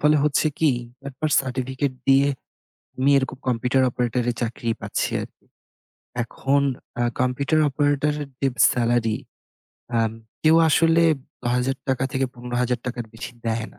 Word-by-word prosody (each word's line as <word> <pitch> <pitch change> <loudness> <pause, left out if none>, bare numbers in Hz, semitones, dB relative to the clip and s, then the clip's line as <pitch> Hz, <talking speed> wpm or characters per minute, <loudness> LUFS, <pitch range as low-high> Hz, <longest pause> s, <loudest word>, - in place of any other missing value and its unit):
ফলে 150 +1 +4
হচ্ছে 150 +1 +2
কি? 155 -3 +4 0.4
একবার 150 +3 -3
সার্টিফিকেট 130 +1 -2 0.2
দিয়ে 135 +1 +5 0.7
আমি 130 +2 +2
এরকম 135 0 -2
কম্পিউটার 125 +2 +2
অপারেটরে 120 0 0
চাকরি 115 0 -2
পাচ্ছি - - -1
আরকি। - - -11 0.8
এখন 135 +4 0 0.4
আ - - +3 0.2
কম্পিউটার 140 +5 +1
অপারেটরের 145 +1 0
যে 140 - +2 0.3
সেলারি, 120 -2 +1 0.8
আ 115 - +3 0.4
কেউ 160 +1 +6
আসলে 165 +2 +4 0.5
হাজার 130 +2 0
টাকা 130 0 +1
থেকে 135 0 +1
৳১৫,০০০ 125 0 -2
এর 110 - -14
বেশি 110 - -7
দেয় 115 0 -1
না। - - -21
130 Hz, 130 wpm, -23 LUFS, 120-140 Hz, 0.8 s, কেউ